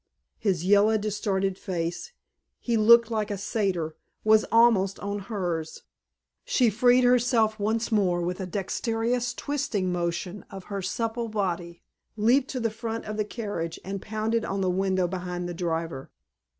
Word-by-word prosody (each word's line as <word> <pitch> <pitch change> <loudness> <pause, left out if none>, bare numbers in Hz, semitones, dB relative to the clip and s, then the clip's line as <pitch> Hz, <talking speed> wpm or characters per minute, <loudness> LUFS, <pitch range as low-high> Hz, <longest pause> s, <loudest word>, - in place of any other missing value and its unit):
His 180 -5 0
yellow 205 +3 +5
distorted 195 -2 -1
face 175 - -3 0.5
he 235 - -1
looked 235 +1 +6
like 215 -2 -1
a 205 - -2
satyr 185 -6 -1 0.3
was 215 0 +5
almost 220 -5 +4
on 200 0 -3
hers. 180 -6 -4 0.6
She 255 - +2
freed 245 +4 +4
herself 240 -3 +3
once 220 +3 0
more 190 -5 +2
with 180 +2 -2
a 190 - -4
dexterous 230 +6 -1
twisting 250 -12 -2
motion 175 +2 -3
of 195 -1 -9
her 200 - -2
supple 230 +5 -2
body, 175 -5 -3 0.3
leaped 250 +6 +3
to 265 - -3
the 230 -2 0
front 225 +1 -5
of 215 - -4
the 215 0 -1
carriage 205 -7 -4
and 195 0 -4
pounded 220 +1 -1
on 195 0 -2
the 185 -1 +1
window 185 -1 +1
behind 180 -1 -4
the 175 - -4
driver. 165 -5 -3
205 Hz, 150 wpm, -26 LUFS, 180-225 Hz, 0.6 s, looked